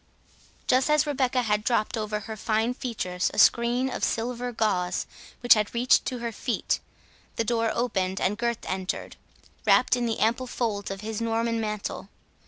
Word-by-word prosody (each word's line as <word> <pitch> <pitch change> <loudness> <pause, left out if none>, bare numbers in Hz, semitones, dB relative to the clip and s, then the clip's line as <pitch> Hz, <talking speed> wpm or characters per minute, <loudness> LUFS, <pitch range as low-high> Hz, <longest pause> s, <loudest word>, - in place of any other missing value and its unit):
Just 260 +3 +3
as 300 0 +4
Rebecca 260 -3 +1
had 210 -2 0
dropped 230 -2 +1
over 215 -1 -2
her 220 +2 -6
fine 220 +2 0
features 200 -8 -2
a - - -8
screen 240 +2 +4
of 265 - -4
silver 245 +2 -1
gauze 190 -6 0 0.4
which 245 -1 +7 0.2
reached 245 +2 +4
to 255 - -2
her 235 -1 -4
feet, 235 +2 -1 0.6
the 230 - 0
door 230 -1 +1
opened, 195 -6 -1
and 195 +3 +1
Gurth 235 +1 -2
entered, 185 0 -4 0.5
wrapt - - +4
in 245 -1 -1
the 225 - -1
ample 235 +4 +1
folds 215 -5 -2
of 195 0 -5
his 220 +1 -4
Norman 230 0 0
mantle. 210 -2 -4
230 Hz, 165 wpm, -26 LUFS, 210-245 Hz, 0.6 s, which